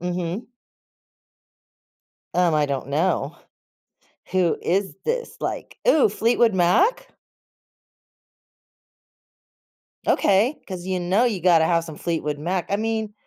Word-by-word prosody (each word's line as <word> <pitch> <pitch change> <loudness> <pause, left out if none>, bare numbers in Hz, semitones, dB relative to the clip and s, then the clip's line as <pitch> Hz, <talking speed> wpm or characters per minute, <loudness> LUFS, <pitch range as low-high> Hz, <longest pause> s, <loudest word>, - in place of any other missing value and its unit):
Mhm. 180 +5 -4 1.9
Um, 175 -3 +3
I 150 -1 +2
don't 140 -1 -3
know. 155 0 0 1.0
Who 180 -3 +2
is 190 +3 -1
this? 475 0 -3
Like - - -5
ooh, 305 - +5
Fleetwood 230 +2 +2
Mac? 185 - +2 3.0
Okay, 215 +9 +2
'cause 185 -2 -6
you 185 -1 -1
know 185 +7 +2
you 210 -8 0
gotta 165 -3 +4
have 165 -1 +2
some 155 -3 -9
Fleetwood 150 -3 -3
Mac. 175 +4 -2
I 200 - +1
mean, 220 0 -2
180 Hz, 110 wpm, -23 LUFS, 170-215 Hz, 3.0 s, ooh